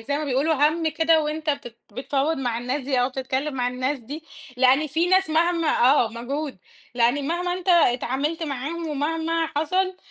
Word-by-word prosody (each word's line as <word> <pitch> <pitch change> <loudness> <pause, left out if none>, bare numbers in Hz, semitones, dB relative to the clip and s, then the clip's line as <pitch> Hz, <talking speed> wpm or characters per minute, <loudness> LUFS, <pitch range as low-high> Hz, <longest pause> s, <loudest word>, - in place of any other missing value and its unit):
زي 285 +1 0
ما 305 - -3
بيقولوا 280 +4 +1
هَمّ 310 +3 +2
كده 320 +1 +3
وأنت 305 +1 -2
بتت 280 -5 -5 0.2
بتفاوض 275 +6 -1
مع 245 -4 -2
الناس 250 +4 -2
دي 260 -1 0
أو 250 - +2
تتكلم 265 +2 -3
مع 245 -1 0
الناس 255 +3 -2
دي، 290 +7 -9 0.3
لأن 260 +4 +4
في 320 +4 0
ناس 375 -1 +3
مهما 330 0 +2
آه 250 -1 +4
مجهود، 260 +4 -5 0.4
لأن 245 +4 +2
مهما 355 +1 -1
أنت 370 +1 -5
اتعاملت 295 0 +2
معاهم 310 +3 -4
ومهما 325 +3 -1
حصل 370 +4 0
295 Hz, 170 wpm, -24 LUFS, 260-325 Hz, 0.4 s, لأن